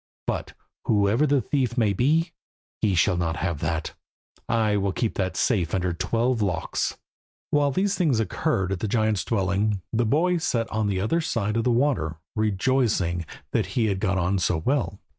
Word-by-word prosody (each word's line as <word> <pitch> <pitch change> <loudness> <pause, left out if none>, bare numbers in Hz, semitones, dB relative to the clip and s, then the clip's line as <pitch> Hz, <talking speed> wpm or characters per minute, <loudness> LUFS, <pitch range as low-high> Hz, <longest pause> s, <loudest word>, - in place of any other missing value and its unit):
But, - - -3 0.3
whoever 105 +7 +3
the 140 -2 +3
thief 130 -1 -1
may 110 -4 +3
be, 155 - +2 0.5
he 100 -4 +2
shall 90 +2 +3
not 85 -2 -1
have 85 -3 -2
that; 80 0 -2 0.6
I 110 -3 +2
will 100 -1 0
keep 115 +1 -1
that 95 -2 -2
safe 95 -9 +1
under 90 -1 0
twelve 115 +6 0
locks." 95 -4 -1 0.5
While 145 -1 +3
these 190 +8 +1
things 155 - +2
occurred 110 - 0
at 95 - -2
the 110 - -2
giant's 110 -2 +1
dwelling, 100 -1 0
the 115 0 +1
boy 175 +8 +2
sat 115 -7 0
on 110 -1 0
the 95 -2 0
other 110 - +1
side 105 -8 -1
of 115 - 0
the - - +3
water, 120 - +1 0.2
rejoicing 105 - +1 0.2
that - - 0
he 115 - +3
had 100 -3 0
got 95 -2 0
on 95 +2 +1
so 90 -1 +1
well. 110 - -1
110 Hz, 180 wpm, -25 LUFS, 95-125 Hz, 0.6 s, whoever